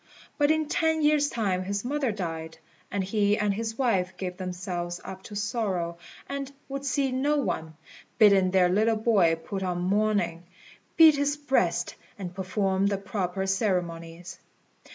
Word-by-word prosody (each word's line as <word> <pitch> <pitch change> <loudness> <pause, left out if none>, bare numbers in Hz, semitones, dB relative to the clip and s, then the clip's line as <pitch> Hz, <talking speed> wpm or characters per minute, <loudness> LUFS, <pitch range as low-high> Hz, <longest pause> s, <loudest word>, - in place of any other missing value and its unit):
But 290 0 +4
in 315 -1 +2
ten 320 0 +1
years' 295 -1 +3
time 195 -6 -1
his 200 +3 -3
mother 275 -2 0
died, 165 -5 -5 0.3
and 200 -1 -1
he 205 +1 +1
and 205 -1 +1
his 225 +2 -4
wife 190 -8 0
gave 180 -1 -4
themselves 180 -1 -4
up 190 0 -7
to 210 - -9
sorrow, 200 -6 -2 0.3
and 275 -1 -4 0.2
would 275 0 -5
see 270 0 +1
no 285 +4 +1
one, 160 - -2 0.4
bidding 200 -4 +6
their 185 -1 +4
little 215 +5 +2
boy 205 -7 +3
put 190 +4 -6
on 180 -2 -1
mourning, 190 -3 0 0.5
beat 315 -3 +8
his 285 +1 0
breast, 285 -2 0 0.2
and 180 -3 -6
perform 190 +1 0
the 200 -1 0
proper 190 -1 -3
ceremonies. 180 -3 -2
200 Hz, 155 wpm, -27 LUFS, 180-245 Hz, 0.5 s, beat